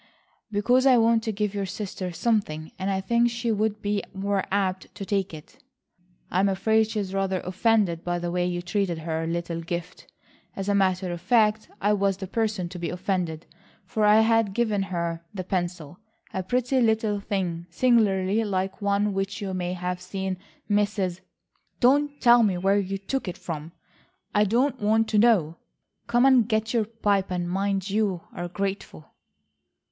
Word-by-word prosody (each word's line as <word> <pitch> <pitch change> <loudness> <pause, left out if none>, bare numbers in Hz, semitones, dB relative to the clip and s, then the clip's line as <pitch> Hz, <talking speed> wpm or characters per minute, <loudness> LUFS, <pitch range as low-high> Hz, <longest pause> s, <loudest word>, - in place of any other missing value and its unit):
"Because 245 +6 +3
I 255 -2 +6
want 230 0 +4
to 220 - 0
give 210 -1 -2
your 200 -1 -2
sister 190 -2 -5
something, 170 -5 -1
and 190 +1 -1
I 190 -1 0
think 235 +4 +2
she 235 0 -2
would 215 0 -1
be 205 0 0
more 195 0 0
apt 190 -2 -1
to 200 - -6
take 195 -2 -1
it." 160 - -12 0.7
"I'm 190 +3 +3
afraid 220 +3 +2
she 220 - -2
is 195 -2 -4
rather 195 -1 0
offended 190 -2 +1
by 175 0 -1
the 175 0 -3
way 180 0 0
you 175 0 -3
treated 180 -1 -1
her 160 0 -3
little 170 0 -3
gift. 170 +1 -6 0.4
As 195 0 -4
a 205 - +2
matter 185 -2 +1
of 175 -1 -5
fact 215 +2 +2
I 205 +1 +2
was 200 -2 +1
the 195 - -5
person 215 -2 -1
to 180 - -8
be 170 - -3
offended, 180 -3 -2 0.4
for 215 +3 -1
I 210 +1 +6
had 225 -3 +2
given 220 -4 +1
her 170 -2 -3
the 185 - -3
pencil. 175 -3 -3 0.3
A 190 - -1
pretty 250 +6 +1
little 220 -2 +2
thing, 180 -4 -3
singularly 210 -1 +2
like 190 -1 -2
one 200 0 +1
which 195 +1 -2
you 195 -2 -4
may 180 -1 -2
have 180 0 -3
seen 190 0 -4 0.3
Mrs.—" 205 -3 0 0.6
"Don't 285 +3 +3
tell 240 -1 +6
me 200 -5 +2
where 195 +3 +2
you 195 0 -2
took 205 +5 -3
it 180 - -4
from. 160 -1 -6 0.6
I 210 0 +4
don't 250 +4 +1
want 220 +2 +3
to 210 - +3
know. 190 -9 +3 0.5
Come 240 +2 +3
and 255 -4 +5
get 220 0 0
your 230 -3 +2
pipe 205 -3 0
and 175 -1 -2
mind 195 +1 -1
you 200 -4 0
are 175 - -4
grateful." 195 - -5
195 Hz, 175 wpm, -25 LUFS, 180-220 Hz, 0.7 s, I